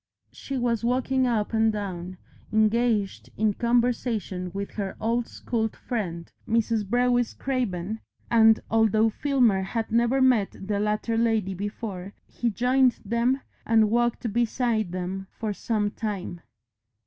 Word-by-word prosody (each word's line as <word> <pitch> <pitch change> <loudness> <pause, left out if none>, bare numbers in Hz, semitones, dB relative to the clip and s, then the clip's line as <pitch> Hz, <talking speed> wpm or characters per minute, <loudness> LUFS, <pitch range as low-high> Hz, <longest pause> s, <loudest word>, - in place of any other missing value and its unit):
She 275 - -5
was 235 -2 0
walking 255 +2 +1
up 225 -2 0
and 220 0 +3
down, 185 -3 -5 0.3
engaged 220 -1 +1
in 215 -1 +2
conversation 235 -6 0
with 200 +2 -5
her 200 -3 -4
old 230 +2 0
school 225 -2 -2
friend, 185 -8 -4 0.2
Mrs. 225 -2 +1
Brewis 245 0 +2
Craven, 220 -6 -2 0.3
and 225 -1 +6
although 220 0 +3
Filmer 245 -6 +2
had 220 +4 -3
never 235 +3 +3
met 250 -6 +3
the 200 +1 -2
latter 210 +2 0
lady 220 -4 +1
before, 200 -1 -5
he 240 - -2
joined 250 +3 +3
them 235 +5 +1 0.2
and 220 -2 +3
walked 240 -1 0
beside 235 -4 0
them 185 +1 -4
for 215 -2 -2
some 210 0 -1
time. 195 -6 -4
225 Hz, 130 wpm, -26 LUFS, 200-240 Hz, 0.3 s, and